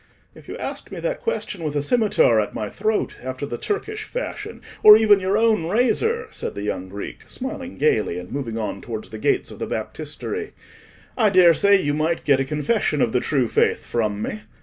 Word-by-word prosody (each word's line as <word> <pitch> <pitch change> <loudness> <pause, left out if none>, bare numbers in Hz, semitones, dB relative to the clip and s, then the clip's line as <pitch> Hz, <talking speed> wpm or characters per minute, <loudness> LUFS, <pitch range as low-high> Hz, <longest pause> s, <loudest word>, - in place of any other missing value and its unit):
"If - - -16
you - - -6
asked - - -6
me - - -6
that - - -3
question 205 - -3
with 150 -2 -3
a 145 - 0
scimitar 200 - +3
at 105 - -5
my 105 -1 -3
throat, 215 +1 -1
after 130 +2 -4
the 120 -4 -5
Turkish 430 +1 -3
fashion, - - -6 0.2
or 210 0 +10
even 210 -2 +5
your 190 +2 +1
own 220 -7 +2
razor," 255 - +1
said - - -5
the 100 - -5
young 95 -2 -3
Greek, 100 +2 -8
smiling 260 0 -6
gaily, 110 - +1
and 90 0 -8
moving 120 -5 -4
on 110 -3 -4
towards 110 -2 -6
the 110 - -8
gates - - 0
of - - -11
the - - -3
Baptistery, 155 - -5 0.6
"I 220 -4 +4
daresay 185 +2 +5
you 145 -5 0
might 160 +3 -1
get 140 -2 +4
a 135 - 0
confession 150 - 0
of 115 - +2
the 125 - +2
true 130 -2 0
faith - - +1
from 105 -3 -1
me. 105 - -4
155 Hz, 200 wpm, -22 LUFS, -, 0.6 s, or